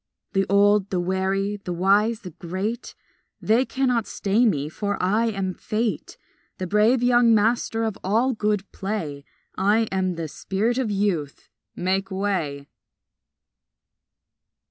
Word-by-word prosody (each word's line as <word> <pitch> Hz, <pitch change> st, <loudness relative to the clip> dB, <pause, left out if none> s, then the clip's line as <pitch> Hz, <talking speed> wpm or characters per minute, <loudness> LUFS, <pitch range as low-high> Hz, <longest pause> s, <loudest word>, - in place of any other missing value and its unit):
The 195 Hz, 0 st, +1 dB
old, 200 Hz, 0 st, +4 dB
the 185 Hz, -, -1 dB
wary, 190 Hz, +3 st, -1 dB
the 195 Hz, -3 st, -7 dB
wise, 205 Hz, +6 st, +2 dB
the 180 Hz, -, -8 dB
great, 190 Hz, +8 st, -5 dB, 0.4 s
They 230 Hz, +4 st, +2 dB
cannot 250 Hz, -5 st, 0 dB
stay 210 Hz, +5 st, +1 dB
me, 145 Hz, -8 st, 0 dB
for 205 Hz, +6 st, -3 dB
I 215 Hz, +5 st, +2 dB
am 195 Hz, -4 st, -2 dB
Fate, 220 Hz, +4 st, -3 dB, 0.4 s
The 185 Hz, -, -3 dB
brave 215 Hz, +6 st, +3 dB
young 240 Hz, -2 st, +5 dB
master 225 Hz, +1 st, +1 dB
of 220 Hz, -3 st, -3 dB
all 230 Hz, +7 st, +2 dB
good 210 Hz, -2 st, 0 dB
play, 170 Hz, -9 st, -4 dB, 0.3 s
I 205 Hz, +4 st, +3 dB
am 185 Hz, -1 st, 0 dB
the 165 Hz, -1 st, -4 dB
spirit 215 Hz, -, -1 dB
of 250 Hz, -4 st, -1 dB
Youth; 195 Hz, -8 st, -2 dB, 0.3 s
make 190 Hz, +2 st, -1 dB
way! 180 Hz, -8 st, -2 dB
200 Hz, 130 wpm, -24 LUFS, 185-225 Hz, 0.4 s, young